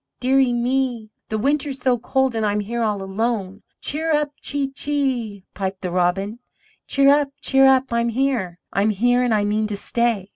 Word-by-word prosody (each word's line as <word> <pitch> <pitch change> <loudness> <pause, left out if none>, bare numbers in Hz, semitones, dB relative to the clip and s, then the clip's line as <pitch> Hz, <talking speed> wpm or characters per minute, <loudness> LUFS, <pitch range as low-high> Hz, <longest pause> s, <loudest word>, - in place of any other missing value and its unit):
dear 265 +2 +3
ie 260 -2 +3
me! 240 -2 -1 0.2
The 220 - -1
winter 285 +5 +1
is 270 - -4
so 250 -2 +1
cold 265 +1 0
and 225 -1 -1
I'm 210 0 +1
here 235 +3 -3
all 210 -3 -1
alone!" 200 0 -2 0.2
"Cheerup, 300 -1 0
chee 280 -1 -1
chee!" 260 -8 -2
piped 190 -1 -4
the 180 -2 -3
Robin: 190 +5 0 0.5
"Cheerup, 280 +1 +4
cheerup, 265 -2 +4
I'm 235 0 +1
here! 230 -8 -1 0.2
I'm 200 +3 +2
here 245 +4 +2
and 250 -1 +1
I 210 -2 +2
mean 215 +1 0
to 210 -1 -4
stay. 230 -3 -1
235 Hz, 175 wpm, -21 LUFS, 205-270 Hz, 0.5 s, Cheerup